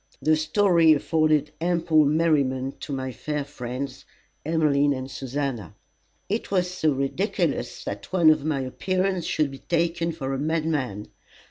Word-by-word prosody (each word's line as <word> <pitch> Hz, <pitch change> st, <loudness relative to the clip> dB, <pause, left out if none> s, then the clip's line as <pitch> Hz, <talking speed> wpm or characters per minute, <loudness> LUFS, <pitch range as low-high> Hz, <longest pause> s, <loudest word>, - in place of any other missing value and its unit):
The 155 Hz, 0 st, +3 dB
story 165 Hz, +1 st, +4 dB
afforded 155 Hz, -1 st, +1 dB
ample 170 Hz, -3 st, +3 dB
merriment 140 Hz, -4 st, +1 dB
to -, -, -6 dB
my 130 Hz, -1 st, -3 dB
fair 145 Hz, +5 st, -4 dB
friends 130 Hz, -1 st, -6 dB, 0.4 s
Emmeline 145 Hz, -3 st, +2 dB
and 130 Hz, 0 st, -6 dB
Susannah. 135 Hz, -, -4 dB, 0.5 s
"It 215 Hz, +4 st, -2 dB
was 180 Hz, -2 st, +1 dB
so 160 Hz, -4 st, +1 dB
ridiculous 140 Hz, +10 st, -1 dB
that -, -, -6 dB
one 170 Hz, -4 st, +6 dB
of 155 Hz, -2 st, +1 dB
my 150 Hz, -3 st, -1 dB
appearance 185 Hz, +7 st, -1 dB
should 150 Hz, -3 st, 0 dB
be 135 Hz, -, -9 dB
taken 170 Hz, 0 st, 0 dB
for 135 Hz, -5 st, -4 dB
a 135 Hz, -, -2 dB
madman. 150 Hz, -9 st, -1 dB
155 Hz, 140 wpm, -25 LUFS, 135-165 Hz, 0.5 s, one